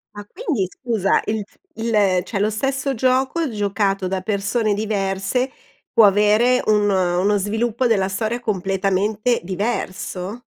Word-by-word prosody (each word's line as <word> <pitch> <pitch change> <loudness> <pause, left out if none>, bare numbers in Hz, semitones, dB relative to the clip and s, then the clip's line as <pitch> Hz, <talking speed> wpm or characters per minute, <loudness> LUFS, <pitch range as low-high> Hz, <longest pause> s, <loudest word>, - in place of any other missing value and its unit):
Ma 205 0 -8
quindi 275 - -2
scusa 220 -6 0
il 215 -1 -2 0.3
il 210 -5 +2
cioè, 200 0 -4
lo 210 +2 +2
stesso 270 +4 -1
gioco 260 +6 +1
giocato 200 -2 -1
da 190 0 -2
persone 210 +2 0
diverse, 205 +4 -1 0.4
può 225 - +6
avere 210 +5 +4
un 210 -1 +3
uno 185 +1 +2
sviluppo 220 +5 -1
della 200 -5 +2
storia 220 +5 -2
completamente 200 +2 0
diverso? 195 +1 -4
210 Hz, 125 wpm, -21 LUFS, 195-235 Hz, 0.4 s, può